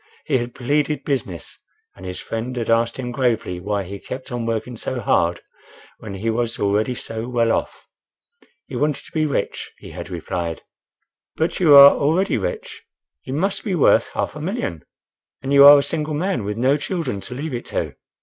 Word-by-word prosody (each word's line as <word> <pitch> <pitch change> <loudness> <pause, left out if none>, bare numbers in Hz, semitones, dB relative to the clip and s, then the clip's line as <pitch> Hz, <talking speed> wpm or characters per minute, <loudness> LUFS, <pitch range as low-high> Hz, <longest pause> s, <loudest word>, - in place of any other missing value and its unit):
He 135 -5 +2
had 120 0 -5
pleaded 145 +3 0
business, 125 - -4 0.3
and 95 - -10
his 90 - -5
friend 115 +3 -4
had 115 -2 -1
asked 115 0 +2
him 125 -2 -4
gravely 115 -7 0
why 100 +2 -2
he 100 +2 -8
kept 130 +5 -8
on 120 -1 -3
working 115 +2 -2
so 125 +3 -4
hard 85 -5 +1 0.6
when 105 -3 -7
he 110 +4 -1
was 115 0 -1
already 105 +5 +1
so 115 0 -6
well 115 -2 +2
off. - - -3 0.8
He - - -8
wanted 145 +3 -1
to - - -13
be 155 -1 +1
rich, 140 - -3
he - - -12
had - - -8
replied. 85 -2 -4 0.7
"But 160 +2 -1
you 155 -6 +7
are 140 0 +11
already 170 +8 +1
rich—you - - -7
must 195 +6 -1
be 195 -5 -1
worth 155 - +4
half - - -2
a 150 - -7
million? 155 - -3 0.6
and 135 +1 -1
you 140 0 +8
are 145 +1 +11
a 140 - +2
single 150 +1 -2
man, 175 - -1
with 105 +1 -3
no 130 +4 +3
children 160 - -3
to 125 - -8
leave 145 +2 -4
it 120 - -4
to." - - -3
125 Hz, 190 wpm, -21 LUFS, 110-150 Hz, 0.8 s, are